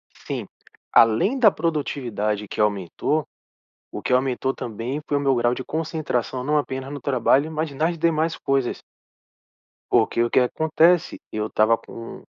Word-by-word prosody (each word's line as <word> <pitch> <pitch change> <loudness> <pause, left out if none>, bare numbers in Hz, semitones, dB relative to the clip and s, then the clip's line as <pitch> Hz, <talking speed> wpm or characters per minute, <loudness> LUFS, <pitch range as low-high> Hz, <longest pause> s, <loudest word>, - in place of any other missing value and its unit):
Sim. - - -6 0.4
Além 115 - +4
da 220 -5 +6
produtividade 125 - -2
que - - -8
aumentou. 105 - 0 0.6
O - - -7
que - - -3
aumentou 130 +1 +1
também 120 +6 -5
foi 145 - 0
o - - 0
meu 140 -1 +2
grau 120 0 +1
de 130 - -5
concentração, 150 -6 -2
não 150 +2 +1
apenas 135 -2 -3
no 145 - -5
trabalho, 140 +3 +2
mas 155 -1 -2
nas 160 +5 -1
demais 160 0 +1
coisas. 135 -3 -1 1.1
Porque 115 - +3
o 120 - 0
que - - +4
acontece? 160 +6 +2
Eu 110 0 -2
estava 110 +1 +3
com 115 0 -10
135 Hz, 150 wpm, -23 LUFS, 120-155 Hz, 1.1 s, da